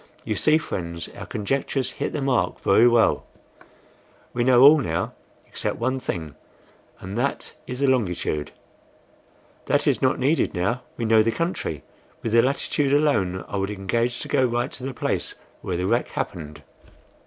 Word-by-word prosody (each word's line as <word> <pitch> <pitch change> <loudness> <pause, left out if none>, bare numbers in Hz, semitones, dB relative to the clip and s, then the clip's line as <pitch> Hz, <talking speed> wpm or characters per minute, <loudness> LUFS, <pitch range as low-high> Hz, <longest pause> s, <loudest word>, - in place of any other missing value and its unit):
You 110 - -1
see, 155 +9 +3
friends, 85 - -5
our - - -9
conjectures 135 +4 -1
hit 140 - -3
the 145 - -3
mark 135 -3 +1
very 115 - +5
well; 120 -1 +3 1.1
we 120 - 0
know 125 0 +6
all 150 +3 +9
now 80 -11 -2 0.3
except - - -3
one 130 +3 -1
thing, 80 - -4 0.7
and 95 +2 -7
that 140 +3 -2
is 125 +2 -5
the 140 - +3
longitude." 90 - 0 1.2
"That - - +2
is - - +2
not 130 0 +2
needed 140 +5 +1
now, 100 +8 0 0.2
we 115 - -2
know 110 0 +5
the 115 +1 +2
country. 165 - -3 0.4
With 115 - -2
the 115 +1 +6
latitude 140 +1 0
alone, 100 -12 +1
I 100 - -4
would 100 0 -1
engage 115 +5 -1
to - - -5
go 130 - +2
right 120 +1 0
to 125 - -10
the 135 -1 -4
place - - -2 0.3
where 90 - -3
the 90 - -1
wreck 115 +5 +1
happened." 75 -4 -5
120 Hz, 165 wpm, -24 LUFS, 95-135 Hz, 1.2 s, all